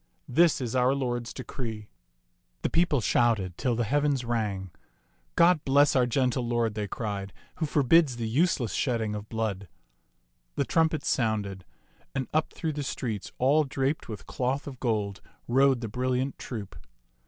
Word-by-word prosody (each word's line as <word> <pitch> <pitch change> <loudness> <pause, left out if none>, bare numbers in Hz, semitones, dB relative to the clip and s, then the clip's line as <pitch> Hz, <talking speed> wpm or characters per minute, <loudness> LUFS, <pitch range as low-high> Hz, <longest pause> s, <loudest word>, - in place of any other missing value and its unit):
This 165 +5 +4
is 125 -2 -3
our 130 +2 +3
lord's 120 -3 -2
decree." 110 -4 -6 0.7
The - - 0
people 165 -5 +2
shouted 105 -6 +2
till 125 +3 0
the 120 - 0
heavens 140 +1 +1
rang. 105 -6 -2 0.3
" - - -42 0.3
God 170 -2 +5
bless 140 +2 +4
our 125 -2 +4
gentle 125 +1 +1
lord," 120 -2 +1
they 105 -1 -3
cried, 100 -2 -4
" - - -33
who 160 - -1
forbids 145 0 +4
the 115 -2 -2
useless 130 - +1
shedding 115 -5 0
of 105 0 -6
blood." 110 -4 -2 0.9
The - - 0
trumpets 160 -2 +1
sounded, 105 - -1 0.5
and 135 -2 -1
up 155 0 +1
through 160 -2 -3
the 145 - -3
streets 115 -5 -4
all 145 +5 +4
draped 135 +1 -2
with 110 - -7
cloth 130 +2 -2
of 135 -4 -8
gold 105 -5 -1 0.3
rode 135 0 +4
the 115 - -3
brilliant 130 +4 -1
troop. 105 -6 -6
125 Hz, 160 wpm, -28 LUFS, 110-140 Hz, 0.9 s, God